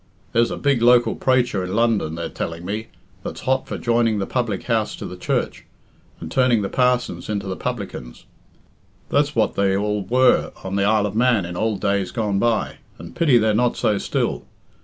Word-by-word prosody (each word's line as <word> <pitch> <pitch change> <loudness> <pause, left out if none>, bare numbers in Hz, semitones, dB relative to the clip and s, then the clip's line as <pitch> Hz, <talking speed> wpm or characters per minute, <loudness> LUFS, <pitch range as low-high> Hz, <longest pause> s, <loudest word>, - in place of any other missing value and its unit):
There's 115 0 +2
a - - -4
big 140 -4 +1
local 120 0 +5
praicher 125 -7 +1
in 90 +2 -4
London, 110 -8 +1
they're 85 - -4
telling 85 +1 -5
me, 105 +4 -4 0.3
that's - - -7
hot 130 0 0
for - - -4
joining 115 -2 +1
the 100 - -1
public 120 -5 -2
house 110 -3 -1
to - - -8
the 90 - -7
church, 90 - -2 0.6
and - - -8
turning 125 -5 +3
the 100 - -2
parsons 125 -3 0
into 100 -2 -2
the 95 -1 -3
publicans. 100 - -6 0.8
That's - - +1
what - - +2
they 95 -1 +1
all 105 +1 -1
were 125 +4 +3
on 95 0 -4
the 100 0 +2
Isle 105 0 +3
of 105 0 -4
Man 120 -5 +3
in 90 0 -6
ould 110 +1 -1
days 100 -2 0
gone 105 -5 -1
by, 115 -1 0 0.2
and 85 +1 -11
pity 145 -7 +4
they're 110 -1 +2
not 120 +3 +1
so 105 -2 +1
still. - - -2
110 Hz, 195 wpm, -21 LUFS, 100-120 Hz, 0.8 s, local